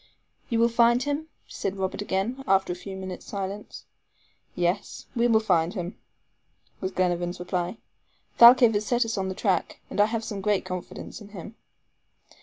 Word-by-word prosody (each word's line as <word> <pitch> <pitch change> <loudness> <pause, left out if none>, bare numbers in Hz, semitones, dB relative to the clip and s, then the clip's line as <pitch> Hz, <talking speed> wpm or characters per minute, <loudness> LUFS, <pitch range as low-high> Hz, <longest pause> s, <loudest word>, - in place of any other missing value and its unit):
"You 230 - +1
will 230 +1 +5
find 235 +1 +4
him?" 290 +2 -2 0.2
said 195 0 -4
Robert 190 +1 -2
again, 205 +7 -2
after 190 -2 +3
a - - -7
few 190 +2 -8
minutes' 185 -1 -7
silence. 200 +1 -6 0.7
"Yes, 180 +3 -1
we'll 235 -2 +4
find 180 -4 +1
him," 180 -1 -4 0.8
was 185 - -2
Glenarvan's 175 -1 -1
reply, 180 +2 -2 0.6
"Thalcave 240 -1 +9
has 205 0 0
set 240 -1 +2
us 225 - -2
on 190 -2 -2
the 190 - -4
track, 190 -5 0
and - - +2
I - - +6
have 225 0 -3
great 205 0 +1
confidence 185 +4 -7
in 205 - -10
him." 205 +2 -9
200 Hz, 160 wpm, -26 LUFS, 185-230 Hz, 0.8 s, Thalcave